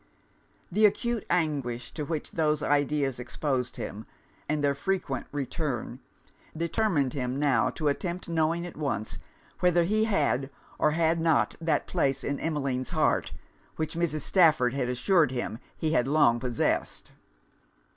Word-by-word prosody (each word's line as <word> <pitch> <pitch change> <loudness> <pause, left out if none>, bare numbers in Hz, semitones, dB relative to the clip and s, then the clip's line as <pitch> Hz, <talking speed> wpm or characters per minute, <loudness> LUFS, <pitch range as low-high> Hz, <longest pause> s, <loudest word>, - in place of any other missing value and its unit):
The 210 +4 +6
acute 235 +2 -2
anguish 140 -8 -1
to 150 - -4
which 155 0 -4
those 155 -2 +1
ideas 145 -2 +1
exposed 130 0 -2
him, 105 +2 -6 0.4
and 150 -1 0
their 140 -1 +3
frequent 140 -4 -2
return, 135 -3 -3 0.6
determined 165 - +1
him 125 -1 -2
now 135 -5 +2
to 150 +4 -3
attempt 175 +5 -2
knowing 165 +1 0
at 175 - -8
once, 135 -9 -3 0.4
whether 175 -1 +4
he 215 +5 +2
had 145 - +1 0.3
or - - +4
had 165 +1 +2
not 160 -2 +2
that 165 -1 +1
place 135 0 0
in 140 -1 -2
Emmeline's 135 -5 -2
heart - - +1 0.4
which 155 - -2
Mrs. 160 -3 -1
Stafford 155 -8 +4
had 130 -3 -1
assured 155 +5 +3
him 120 -3 -4 0.2
he 155 - -1
had 130 -6 +2
long 140 -5 +4
possessed. 125 -2 -1
150 Hz, 140 wpm, -28 LUFS, 130-165 Hz, 0.6 s, The